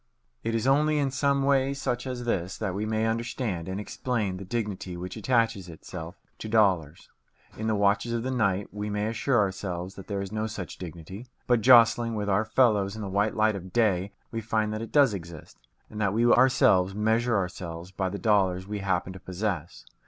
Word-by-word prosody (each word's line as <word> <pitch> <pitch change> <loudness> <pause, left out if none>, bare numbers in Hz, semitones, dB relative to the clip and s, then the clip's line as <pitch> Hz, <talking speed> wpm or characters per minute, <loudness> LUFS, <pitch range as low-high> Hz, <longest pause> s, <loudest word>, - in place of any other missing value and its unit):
It 115 0 -1
is 115 - -1
only 150 +3 +3
in 140 -2 +1
some 140 +1 +1
way 135 0 +2
such 125 -2 -2
as 125 -1 -4
this 95 -6 -2
that 100 -4 -2
we 105 +3 -2
may 110 0 0
understand 115 -6 -2
and 95 +2 -3
explain 105 -3 -2
the 95 - -7
dignity 100 -4 -4
which 90 +1 -6
attaches 115 -4 0
itself 85 +1 -8 0.2
to 110 - -6
dollars. 95 -8 +1 0.5
In 110 - -4
the 110 - +1
watches 100 +3 +2
of 115 -1 -1
the 130 - -2
night, 100 -6 0
we 105 0 -4
may 105 0 -1
assure 115 +4 0
ourselves 95 -2 -2
that 95 -1 -11
there 100 -2 -2
is 100 0 -5
no 110 0 -2
such 100 -5 -7
dignity; 90 +6 -8 0.2
but 120 -2 +2
jostling 115 -1 +6
with 105 -1 -2
our 100 +3 +2
fellows 110 -4 +2
in 110 - -6
the 100 - -4
white 100 +3 0
light 110 -1 +2
of 95 -1 -8
day, 100 -3 +1 0.2
we 115 -1 -3
find 110 -1 -1
that 110 - -4
it 115 - -7
does 140 -7 +5
exist, 85 -5 -9 0.3
and 105 - -7
that 100 -2 +1
we 115 +1 +3
ourselves 120 -7 +4
measure 110 +2 +2
ourselves 90 -2 -5
by 95 -1 -2
the 100 - -5
dollars 95 -4 +2
we 105 0 -4
happen 95 -1 -1
to 95 - -10
possess. 90 - -4
105 Hz, 205 wpm, -27 LUFS, 95-115 Hz, 0.5 s, jostling